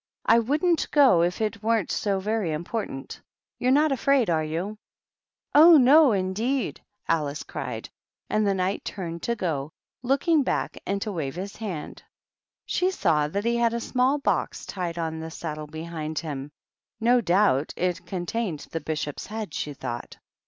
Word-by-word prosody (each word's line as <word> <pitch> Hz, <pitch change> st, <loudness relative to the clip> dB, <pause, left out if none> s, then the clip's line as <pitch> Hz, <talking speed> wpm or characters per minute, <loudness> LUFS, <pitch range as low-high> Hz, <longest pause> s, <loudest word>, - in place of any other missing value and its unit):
I 230 Hz, -, +6 dB
wouldn't 305 Hz, +8 st, +1 dB
go 270 Hz, -, +5 dB
if 175 Hz, +5 st, 0 dB
it 215 Hz, -1 st, -2 dB
weren't 220 Hz, -4 st, +1 dB
so 200 Hz, -2 st, 0 dB
very 210 Hz, -3 st, -1 dB
im 155 Hz, +2 st, -3 dB
portant. 175 Hz, -9 st, -5 dB, 0.4 s
You're 250 Hz, -, +1 dB
not 295 Hz, +3 st, +4 dB
afraid, 270 Hz, -5 st, +2 dB
are 160 Hz, -1 st, +2 dB
vo'i 170 Hz, +7 st, -3 dB, 0.3 s
?" -, -, -68 dB
" -, -, -50 dB
Oh, 320 Hz, +2 st, +9 dB
no 280 Hz, +2 st, +7 dB
indeed 215 Hz, +7 st, -1 dB
!" -, -, -42 dB
Alice 150 Hz, -2 st, 0 dB
cried; -, -, -5 dB, 0.4 s
and 215 Hz, -1 st, +1 dB
the 195 Hz, -, +2 dB
Knight 185 Hz, +1 st, -1 dB
turned 170 Hz, -4 st, -5 dB
to 235 Hz, -, -1 dB
go, 155 Hz, -8 st, -2 dB, 0.3 s
looking 280 Hz, +5 st, +2 dB
back 265 Hz, -, -1 dB, 0.3 s
to 215 Hz, -, -2 dB
wave 150 Hz, -6 st, -3 dB
hie 185 Hz, +3 st, -4 dB
hand. 185 Hz, -9 st, -5 dB, 0.6 s
She 365 Hz, -, +1 dB
saw 160 Hz, -, +1 dB
that 200 Hz, +8 st, -3 dB
he 235 Hz, 0 st, +2 dB
had 235 Hz, -1 st, +2 dB
a -, -, -1 dB
small 255 Hz, +4 st, +1 dB
box 280 Hz, -, -1 dB
tied 175 Hz, -3 st, -4 dB
on 160 Hz, -1 st, -3 dB
the 160 Hz, 0 st, -5 dB
saddle 155 Hz, -2 st, -6 dB
behind 160 Hz, 0 st, -6 dB
him; 145 Hz, -3 st, -4 dB, 0.5 s
no 240 Hz, +2 st, +4 dB
doubt 175 Hz, -, +2 dB
it 180 Hz, -1 st, -1 dB
contained 180 Hz, -3 st, -3 dB
the 165 Hz, -, -3 dB
Bishop's 150 Hz, -2 st, -4 dB
head, 215 Hz, -6 st, -5 dB
she 150 Hz, -, -3 dB
thought. 120 Hz, -2 st, -6 dB
195 Hz, 170 wpm, -26 LUFS, 160-235 Hz, 0.6 s, Oh